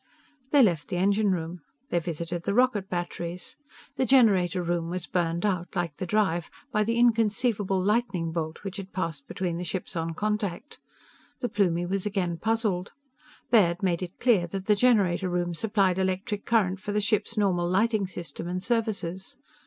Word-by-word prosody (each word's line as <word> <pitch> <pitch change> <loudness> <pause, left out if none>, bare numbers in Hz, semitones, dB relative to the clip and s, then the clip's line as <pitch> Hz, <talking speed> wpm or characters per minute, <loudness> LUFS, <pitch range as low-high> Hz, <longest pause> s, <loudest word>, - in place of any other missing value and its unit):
They 285 -2 +6
left 170 -8 +1
the - - -3
engine 200 +3 +2
room. 175 -1 -2 0.3
They 175 - +2
visited 170 0 -4
the 200 +4 -1
rocket 235 -6 +2
batteries. 175 +5 -4 0.4
The 260 - +2
generator 195 -8 +4
room 170 -1 -1
was 180 0 -4
burned 170 0 -1
out, 185 -3 -1
like 170 -5 -2
the 185 - -4
drive, 175 -4 +1 0.2
by 215 -3 +2
the 230 +2 0
inconceivable 220 -4 +2
lightning 195 -4 0
bolt 160 -1 -4
which 195 -1 -5
had 195 -1 -8
passed 165 -6 -3
between 175 -3 -3
the 175 - -4
ships 180 +1 -4
on 165 0 -2
contact. 210 - -3 0.6
The 245 - -1
Plumie 175 -4 +1
was 195 +2 -2
again 185 -5 -1
puzzled. 220 -5 -1 0.6
Baird 190 -5 +4
made 175 -2 +1
it 180 0 -6
clear 215 -9 +3
that 190 +2 -5
the 210 - +4
generator 200 -6 +3
room 175 -1 -1
supplied 195 -1 +1
electric 190 +2 -1
current 195 -5 +2
for 205 +2 -4
the 210 - +2
ship's 210 +1 0
normal 180 -4 +2
lighting 210 +1 +2
system 170 -3 -6
and 180 +1 -3
services. 205 -6 -2
190 Hz, 170 wpm, -27 LUFS, 175-210 Hz, 0.6 s, They